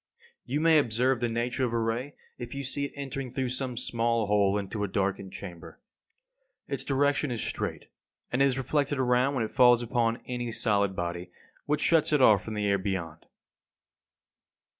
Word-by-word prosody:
You 140 +4 -1
may 160 -1 +5
observe 125 0 +1
the 120 0 0
nature 120 +3 -1
of 120 -2 0
a - - +1
ray 115 +5 -2 0.2
if 120 +1 -7
you 140 - -4
see 140 +2 -1
it - - -6
entering 135 -2 -5
through 130 0 -2
some 130 -1 -3
small 115 -2 0
hole 100 -1 +2
into 105 +1 -3
a - - 0
darkened 95 0 -2
chamber. 85 -4 -10 0.9
Its - - -2
direction 145 +1 +1
is 120 -2 -2
straight; - - -3 0.5
and 125 - +1
it - - +6
is 135 -1 +1
reflected 145 +1 0
around 130 +2 +2
when 125 - 0
it - - -8
falls 125 -2 +5
upon 120 0 0
any 120 -1 -4
solid 100 -3 +1
body, 85 0 -4 0.4
which 150 +1 0
shuts 165 -2 +3
it 150 - +3
off 110 -5 +5
from 110 - -6
the 105 -1 -1
air 100 -1 +2
beyond. 85 -5 -4
120 Hz, 180 wpm, -28 LUFS, 105-135 Hz, 0.9 s, it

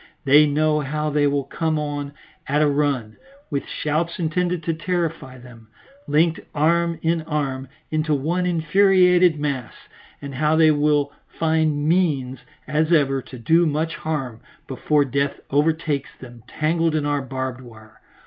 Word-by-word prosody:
They 145 +2 +6
know 150 +1 +1
how 150 +1 -2
they 145 0 +2
will 140 0 0
come 155 +3 -2
on 145 -1 -4 0.3
at 150 +2 +2
a - - +3
run, 140 -7 -1 0.3
with 140 -1 -3
shouts 155 +3 -2
intended 175 +1 -1
to 165 - -1
terrify 165 -6 -3
them, 120 -3 -15 0.4
linked 160 +3 +2 0.2
arm 170 +2 +2
in 165 0 +1
arm 140 -4 -3 0.2
into 155 -1 0
one 170 +6 -1
infuriated 180 0 +4
mass, 140 -5 -3 0.4
and 140 -1 -8
how 150 +3 +1
they 160 -1 +5
will 145 -1 +1
find 160 -2 0
means, 150 -7 +1 0.3
as 155 +2 0
ever, 135 -4 +2
to 130 - -11
do 165 +8 +3
much 155 +2 -1
harm 135 -8 -4 0.3
before 145 +2 +1
death 140 +1 -1
overtakes 150 -1 0
them 120 -2 -12
entangled 165 +1 0
in 150 -2 0
our 145 -1 0
barbed 130 -1 -5
wire. 110 -3 -16
150 Hz, 150 wpm, -22 LUFS, 140-160 Hz, 0.4 s, They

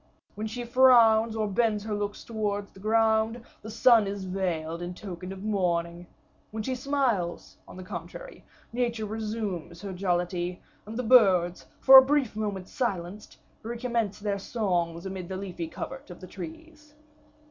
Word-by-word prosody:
When 215 +1 -4
she 240 +3 -5
frowns, 235 -3 +5
or 215 -1 0
bends 210 0 +1
her 215 0 -4
looks 205 0 -3
towards 205 -3 -3
the - - -16
ground, 220 +2 +2 0.2
the 220 - -8
sun 230 -1 +5
is 200 0 -4
veiled 175 -3 -3
in 175 +1 -5
token 185 -2 -7
of 195 0 -8
mourning. 175 -4 -1 0.4
When 215 0 -5
she 260 - -2
smiles, 250 - -1
on - - -12
the 185 - -8
contrary, - - -8 0.3
nature 235 -2 -1
resumes 210 -6 -4
her 195 -2 -5
jollity, 180 -1 -1 0.3
and 220 +1 -6
the 250 - -1
birds, 190 -8 +4
for 265 0 +11
a - - +5
brief 275 -5 +1
moment 205 -4 -3
silenced, 205 -5 -4 0.2
recommence 235 -2 -2
their 205 -1 -2
songs 175 -6 -2
amid 190 -2 -6
the 190 - -4
leafy 180 -4 -5
covert 265 - -7
of 175 - -10
the - - -9
trees. 305 - -11
210 Hz, 160 wpm, -27 LUFS, 185-230 Hz, 0.4 s, for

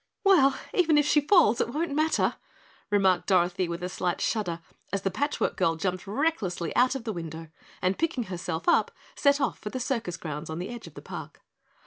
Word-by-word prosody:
"Well, 280 -9 +5 0.2
even 325 -4 +4
if 295 - +4
she 295 0 +4
falls 290 - +4
it - - 0
won't 305 +2 -2
matter," 310 +2 +1 0.5
remarked 190 -3 +3
Dorothy 180 -1 +2
with 170 +1 -5
a - - -1
slight 180 -1 -2
shudder 180 -7 -1 0.3
as 200 0 -2
the 195 - 0
Patch 285 +10 -1
Work - - 0
Girl 165 - +2
jumped 185 +3 -3
recklessly 205 - -1
out 255 +2 +4
of 265 - -4
the 220 -2 -3
window, 165 -2 -7 0.3
and 185 +1 +1
picking 320 -6 0
herself 175 -4 -5
up - - +4 0.3
set 280 0 +3
off 275 - -1
for 210 - -5
the 255 - -4
circus 235 -9 -2
grounds 150 0 -6
on 160 - -4
the 180 +2 -4
edge 240 0 -8
of - - -14
the - - -10
park. - - -9
205 Hz, 205 wpm, -27 LUFS, 175-280 Hz, 0.5 s, Well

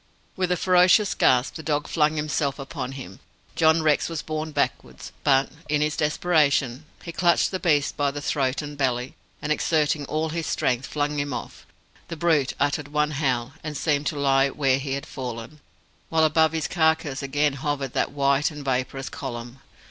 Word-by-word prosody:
With 185 -1 -1
a 180 - +2
ferocious 185 +3 +4
gasp, 125 0 +3
the 160 - -7
dog 150 -1 -1
flung 155 -1 +2
himself 150 -2 -1
upon 135 -2 -5
him. 110 -9 -9 0.4
John 160 0 +4
Rex 155 +1 +2
was 165 -1 -4
borne 155 0 -3
backwards, - - -3
but, 135 -1 +3 0.2
in 150 0 +1
his 150 0 0
desperation, 150 -4 +1 0.2
he 170 - -6
clutched 170 0 +2
the 185 - -2
beast 150 -6 +1
by 145 -1 +2
the 145 +1 -5
throat 140 -1 -1
and 145 0 -7
belly, 130 -2 -1 0.3
and, 150 - -1
exerting 150 -1 +1
all 155 +3 -1
his 165 0 -3
strength, 125 +1 0
flung 150 0 -1
him 145 -1 -2
off. - - -7 0.4
The 165 - -6
brute 155 -5 +2
uttered 145 0 0
one 150 +1 0
howl, 130 -3 -1
and 150 -1 -4
seemed 145 -2 0
to 150 - -2
lie 135 -1 +3
where 135 -1 +1
he 135 0 -3
had 140 0 -4
fallen; 125 +3 -7 0.5
while 160 -1 +2
above 160 +1 +4
his 160 -2 -1
carcase 160 -5 +1
again 145 +1 +1
hovered 140 -1 -3
that - - 0
white 140 +1 +2
and 150 -3 -9
vaporous 130 +1 -2
column. 120 -2 -7
145 Hz, 180 wpm, -24 LUFS, 135-155 Hz, 0.5 s, ferocious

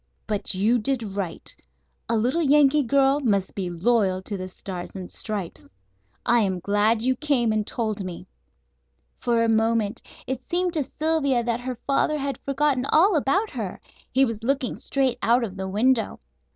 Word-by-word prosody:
But 205 -3 -2
you 220 +6 +2
did 245 +2 -1
right. 185 -5 -4 0.5
A 230 - +2
little 250 +10 +1
Yankee 295 -1 +5
girl 275 +2 +3
must 200 -8 0
be 190 -3 -3
loyal 185 +1 +1
to 205 - -4
the 185 -1 -5
Stars 185 -1 -7
and 185 -2 -7
Stripes. 180 - -5 0.6
I 240 0 +4
am 190 -4 0
glad 205 +4 +2
you 260 +1 +2
came 255 -5 +1
and 215 -1 -1
told 215 -4 -2
me." 180 -1 -7 0.9
For 235 -2 +1
a - - +2
moment 225 -1 +1 0.2
it 260 0 -3
seemed 355 +3 0
to 310 -4 +1
Sylvia 295 -6 +1
that 235 0 -1
her 250 +1 -4
father 285 +2 +2
had 275 -3 -3
forgotten 275 -1 0
all 360 +5 +5
about 370 +9 +1
her. 220 -9 -5 0.3
He 265 +1 +4
was 230 -3 -4
looking 270 +2 0
straight 265 -3 -1
out 240 +2 +3
of 200 -4 -5
the 190 0 -4
window. 225 +4 +1
235 Hz, 170 wpm, -24 LUFS, 205-275 Hz, 0.9 s, Yankee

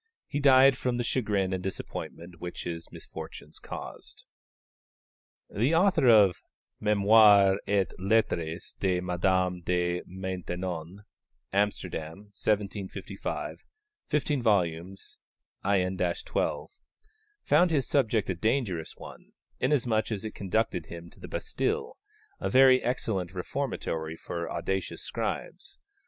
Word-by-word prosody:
He 145 - -2
died 135 -1 +7
from 125 -1 0
the 120 - 0
chagrin 105 -6 0
and 95 - -2
disappointment 90 -2 -6
which 90 0 -5
his 85 -1 -6
misfortunes - - -9
caused. - - -9 1.2
The 125 +10 +1
author 170 -6 +4
of 105 -6 +6 0.4
Mémoires 105 -1 +6
et 100 -1 +1
Lettres 90 -5 0
de 95 -2 +1
Madame 90 0 +1
de 90 0 0
Maintenon 90 -1 -5 0.5
(Amsterdam, 100 -2 -2
1755, 100 -2 -3 0.4
15 145 -2 0
vols., 95 -4 -1 0.4
in 95 -1 +1
12) 85 -1 -1 0.7
found 170 +5 +4
his 145 -5 +1
subject 115 -7 +2
a 95 - 0
dangerous 95 - -1
one, - - -12 0.3
inasmuch 120 -6 +1
as 105 -1 -3
it 110 - -5
conducted 100 -3 -1
him 85 0 -9
to - - -18
the - - -9
Bastille, 445 - -2 0.4
a - - -1
very 130 0 +6
excellent 95 -7 -2
reformatory 85 - -3
for 85 -1 -5
audacious 95 +3 -3
scribes. - - -4
100 Hz, 110 wpm, -28 LUFS, 90-115 Hz, 1.2 s, died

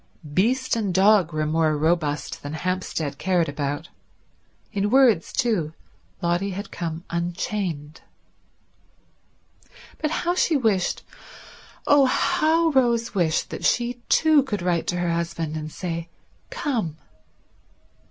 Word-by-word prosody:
Beast 250 - +2
and 210 -4 -1
dog 190 -3 +5
were 155 0 -1
more 155 0 +1
robust 155 -1 0
than 145 +1 -6
Hampstead 165 -4 -3
cared 175 -2 +1
about. 145 +2 -3 0.8
In 200 0 0
words, 240 -8 +4
too, 175 -10 0 0.5
Lotty 175 +3 +1
had 200 +2 -6
come 165 -1 -4
unchained. 170 -2 -3 2.0
But 305 - 0
how 345 +2 0
she 335 -3 +2
wished, 215 -8 0 0.8
oh 285 -1 +6
how 325 +5 +2
Rose 235 -4 +2
wished, 170 -5 0
that - - -6
she 240 0 +1
too 315 -2 +5
could 210 -9 -4
write 175 -2 0
to 175 - 0
her 175 -1 0
husband 165 -2 -2
and 155 0 -5
say 170 -1 -5 0.4
"Come." 250 - -2
180 Hz, 120 wpm, -24 LUFS, 160-235 Hz, 2.0 s, oh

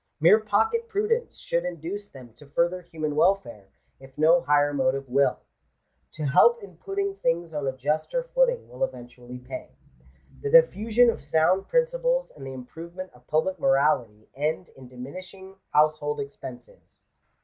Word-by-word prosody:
Mere 170 +8 +6
pocket 445 - 0
prudence 455 +3 -1
should 170 - -1
induce 180 +4 -5
them 125 -4 -13
to 140 +5 -17
further 170 +5 0
human 160 -4 -4
welfare, 145 - +1 0.3
if 135 0 -16
no 165 +3 +5
higher 145 +1 +2
motive 135 0 0
will. 140 +3 +2 0.7
To 155 - -6
help 470 - +4
in - - -12
putting 395 0 -3
things 165 - -1
on 145 -2 -2
a - - +1
juster 155 - -1
footing - - +1
will - - -5
eventually 125 - -6
pay. 125 - -8 0.7
The 430 - -2
diffusion 245 - +5
of - - -8
sound 160 +6 +2
principles - - +1
and 135 -2 -9
the 135 - -6
improvement 170 +8 -9
of 125 0 -22
public 170 +4 0
morality, 135 -7 +1
end 155 +5 -2
in 130 -1 -13
diminishing 185 +10 -10
household 150 0 +2
expenses. 130 -3 -10
160 Hz, 150 wpm, -26 LUFS, 135-215 Hz, 0.7 s, Mere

